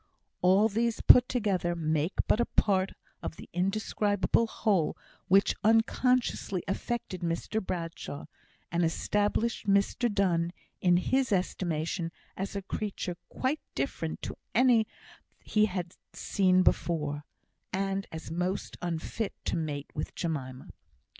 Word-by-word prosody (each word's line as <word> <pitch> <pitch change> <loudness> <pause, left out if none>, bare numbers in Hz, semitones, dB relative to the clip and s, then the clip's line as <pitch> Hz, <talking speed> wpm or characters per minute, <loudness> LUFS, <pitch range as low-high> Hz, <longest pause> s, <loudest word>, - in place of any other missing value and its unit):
All 190 +4 +5
these 230 +2 0
put 250 0 +7
together 195 -8 0
make 160 +1 0
but - - +3
a 240 - +2
part 190 -2 +2 0.3
of - - -5
the - - -11
indescribable 205 +3 +1
whole 200 -8 +1 0.3
which 195 +2 +5
unconsciously 225 -3 +2
affected 195 -2 -3
Mr 170 +6 -1
Bradshaw, 165 -5 -5 0.5
and 170 +1 +1
established 210 +7 0
Mr 200 +4 +2
Donne 175 -4 +1 0.3
in 175 -1 +5
his 260 +7 +1
estimation 170 -2 -1 0.2
as 195 +1 -4
a 200 - -3
creature 195 -3 -3
quite 270 +4 -1 0.2
different 145 +4 -3
to - - -4 0.2
any 235 -2 +5 0.6
he 215 0 +3
had 180 -3 -4 0.2
seen 185 -2 +3
before, 150 -5 +1 0.5
and 195 +1 -1
as 160 -1 -7
most 180 +3 -2
unfit 175 +5 -3
to - - 0
mate 150 -3 -3
with 150 - -4
Jemima. 130 -6 -4
190 Hz, 120 wpm, -29 LUFS, 170-215 Hz, 0.6 s, put